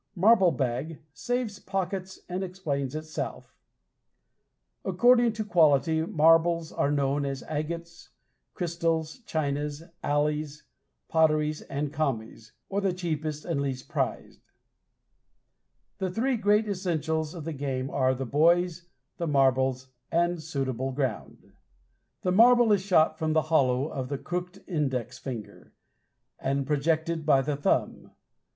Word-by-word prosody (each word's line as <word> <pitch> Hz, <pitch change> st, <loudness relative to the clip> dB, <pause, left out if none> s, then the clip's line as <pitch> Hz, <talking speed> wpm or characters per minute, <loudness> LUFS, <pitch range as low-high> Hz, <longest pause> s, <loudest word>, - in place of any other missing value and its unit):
Marble 195 Hz, 0 st, +5 dB
Bag 135 Hz, +3 st, -2 dB
saves 245 Hz, -2 st, -2 dB
pockets 190 Hz, -1 st, -4 dB
and 180 Hz, +2 st, -3 dB
explains 150 Hz, -7 st, -3 dB
itself. 155 Hz, 0 st, -5 dB, 1.3 s
According 240 Hz, -2 st, +4 dB
to 215 Hz, -1 st, -4 dB
quality, 160 Hz, -4 st, +3 dB
marbles 165 Hz, +1 st, +3 dB
are 140 Hz, -, 0 dB
known 140 Hz, 0 st, +1 dB
as 135 Hz, -2 st, -3 dB
"agates," 170 Hz, +3 st, -5 dB, 0.5 s
"crystals," 165 Hz, 0 st, -1 dB
"chinas," 145 Hz, 0 st, -2 dB, 0.2 s
"alleys," 150 Hz, 0 st, -1 dB, 0.4 s
"potteries," 155 Hz, -1 st, +2 dB
and 145 Hz, +1 st, -4 dB
"commies," 115 Hz, -7 st, -3 dB, 0.2 s
or 200 Hz, +1 st, -1 dB
the 195 Hz, -2 st, +1 dB
cheapest 155 Hz, -4 st, -3 dB
and 165 Hz, -5 st, -1 dB
least 130 Hz, -2 st, -4 dB
prized. -, -, -3 dB, 1.6 s
The 190 Hz, -, -1 dB
three 245 Hz, +8 st, 0 dB
great 210 Hz, 0 st, +2 dB
essentials 160 Hz, -5 st, -2 dB
of 165 Hz, -, -6 dB
the 165 Hz, -, -3 dB
game 135 Hz, -2 st, -3 dB
are 130 Hz, -1 st, +2 dB
the 135 Hz, +1 st, -4 dB
boys, 170 Hz, +5 st, +2 dB, 0.3 s
the 170 Hz, -, -2 dB
marbles, 130 Hz, -2 st, +2 dB, 0.2 s
and 175 Hz, 0 st, +1 dB
suitable 135 Hz, -4 st, -2 dB
ground. 130 Hz, -5 st, -4 dB, 0.7 s
The 180 Hz, -, +1 dB
marble 235 Hz, +3 st, +6 dB
is 200 Hz, -2 st, +4 dB
shot 160 Hz, -5 st, +3 dB
from 155 Hz, -1 st, 0 dB
the 155 Hz, -, +4 dB
hollow 130 Hz, -2 st, +3 dB
of 130 Hz, -3 st, -5 dB
the 140 Hz, -, -2 dB
crooked 180 Hz, +5 st, -5 dB
index 135 Hz, -, -2 dB
finger, 125 Hz, -5 st, -8 dB, 0.7 s
and 135 Hz, +1 st, -1 dB
projected 160 Hz, +3 st, 0 dB
by 135 Hz, -2 st, +4 dB
the 145 Hz, +1 st, -1 dB
thumb. 145 Hz, -, -1 dB
155 Hz, 125 wpm, -27 LUFS, 140-180 Hz, 1.6 s, marble